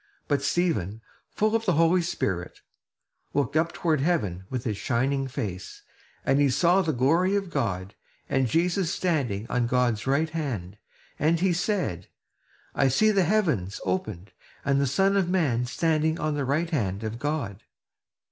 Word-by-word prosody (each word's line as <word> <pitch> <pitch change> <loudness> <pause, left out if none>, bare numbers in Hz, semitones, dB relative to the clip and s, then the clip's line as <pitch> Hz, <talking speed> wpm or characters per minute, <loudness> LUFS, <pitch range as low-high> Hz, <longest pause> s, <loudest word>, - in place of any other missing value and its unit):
But 145 -1 +1
Stephen, 140 - 0 0.3
full 215 +1 +1
of 225 0 0
the - - +4
Holy 165 +3 +4
Spirit, 95 - -3 0.7
looked 145 -1 0
up 165 +2 +2
toward 155 -5 0
heaven 105 - 0
with 125 -2 -3
his 110 -3 -2
shining 135 +4 0
face; 95 -8 -6 0.4
and 135 - +3
he 145 -1 +4
saw 175 +8 +3
the 165 -4 0
glory 165 +9 +2
of 195 -3 -2
God, 100 - -2 0.3
and 135 -1 +1
Jesus 175 - +1
standing 130 - -1
on 125 -1 0
God's 120 -2 +1
right 155 +4 +1
hand, 110 - -4 0.4
and 160 +3 +2
he 185 0 +2
said: 170 - -1 0.7
"I 135 - +3
see 215 +12 +3
the 195 -3 +3
heavens 155 - 0
opened, 95 +1 -3 0.3
and 140 0 +2
the 140 - +2
Son 195 +9 +2
of 190 -3 +1
man 140 -10 +1
standing 160 +3 0
on 155 -1 -1
the 145 -2 -1
right 155 +6 0
hand 105 - -1
of 110 +1 -4
God!" 140 -9 -3
140 Hz, 160 wpm, -26 LUFS, 115-170 Hz, 0.7 s, the